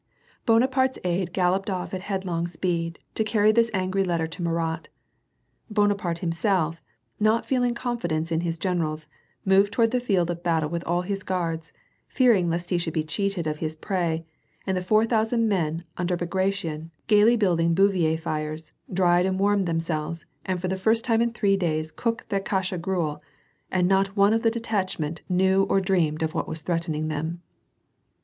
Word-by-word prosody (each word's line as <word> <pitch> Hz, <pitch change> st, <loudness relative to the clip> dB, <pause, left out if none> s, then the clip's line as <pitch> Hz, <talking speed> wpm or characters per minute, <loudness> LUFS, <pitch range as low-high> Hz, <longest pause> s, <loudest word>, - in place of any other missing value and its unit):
* -, -, -34 dB
Bonaparte's 260 Hz, +3 st, +3 dB
aid 180 Hz, 0 st, -1 dB
galloped 185 Hz, +2 st, +1 dB
off 185 Hz, -1 st, -3 dB
at 185 Hz, -, -3 dB
headlong 185 Hz, -4 st, -2 dB
speed, 170 Hz, -1 st, -2 dB, 0.2 s
to 220 Hz, -, +1 dB
carry 215 Hz, 0 st, +3 dB
this 230 Hz, +1 st, +3 dB
angry 190 Hz, 0 st, 0 dB
letter 170 Hz, -3 st, 0 dB
to 165 Hz, +3 st, -7 dB
Murat. 165 Hz, -1 st, -2 dB, 0.8 s
Bonaparte 200 Hz, -5 st, 0 dB
himself, 165 Hz, -2 st, 0 dB, 0.4 s
not 215 Hz, +2 st, +2 dB
feeling 245 Hz, -2 st, +1 dB
confi 240 Hz, -5 st, -2 dB
dence 160 Hz, +1 st, -2 dB
in 165 Hz, 0 st, +1 dB
his 170 Hz, -1 st, -2 dB
generals, 160 Hz, -4 st, -2 dB, 0.4 s
moved 195 Hz, +1 st, +4 dB
toward 225 Hz, 0 st, +2 dB
the 250 Hz, -, +1 dB
field 190 Hz, -8 st, +1 dB
of 170 Hz, 0 st, -6 dB
battle 160 Hz, -3 st, 0 dB
with 170 Hz, 0 st, -2 dB
all 175 Hz, +1 st, 0 dB
his 195 Hz, +1 st, -3 dB
guards, 165 Hz, -4 st, -3 dB, 0.4 s
fearing 230 Hz, -9 st, +3 dB
lest 175 Hz, +2 st, -3 dB
he 175 Hz, -, +2 dB
should 165 Hz, -2 st, -3 dB
be 155 Hz, -, +1 dB
cheated 195 Hz, +1 st, -2 dB
of 155 Hz, -1 st, -2 dB
his 155 Hz, -1 st, -3 dB
prey, 165 Hz, -2 st, -2 dB, 0.4 s
and 190 Hz, -, 0 dB
the 185 Hz, -, -1 dB
four 215 Hz, +4 st, +3 dB
thousand 225 Hz, 0 st, +1 dB
men 165 Hz, -5 st, 0 dB
under 180 Hz, 0 st, 0 dB
Bagration, 175 Hz, -3 st, -2 dB, 0.2 s
gayly 215 Hz, +2 st, +5 dB
building 170 Hz, -6 st, +2 dB
bivouac 175 Hz, -5 st, +2 dB
tires, 155 Hz, 0 st, -4 dB, 0.2 s
dried 180 Hz, 0 st, +3 dB
and 190 Hz, 0 st, -1 dB
warmed 200 Hz, -1 st, +2 dB
themselves, 165 Hz, -1 st, -2 dB, 0.2 s
and 185 Hz, -1 st, -2 dB
for 185 Hz, -, -2 dB
the 190 Hz, +1 st, -1 dB
first 225 Hz, +4 st, +2 dB
time 230 Hz, -2 st, +3 dB
in 235 Hz, 0 st, +1 dB
three 200 Hz, -4 st, +2 dB
days 160 Hz, -4 st, -1 dB
cooked 230 Hz, +4 st, -3 dB
their 200 Hz, -, +1 dB
kasha 190 Hz, -2 st, -1 dB
gruel, 165 Hz, -4 st, -2 dB, 0.5 s
and 180 Hz, -1 st, +2 dB
not 195 Hz, +1 st, +1 dB
one 200 Hz, +2 st, +5 dB
of 225 Hz, -, +2 dB
the 225 Hz, -, +3 dB
detach 220 Hz, -5 st, -2 dB
ment 160 Hz, +1 st, -4 dB
knew 190 Hz, +1 st, +3 dB
or 195 Hz, -, +4 dB
dreamed 175 Hz, -5 st, +1 dB
of 160 Hz, 0 st, -1 dB
what -, -, -2 dB
was 160 Hz, -1 st, -5 dB
threatening 165 Hz, -2 st, -1 dB
them. 160 Hz, +3 st, -3 dB
180 Hz, 180 wpm, -25 LUFS, 165-200 Hz, 0.8 s, gayly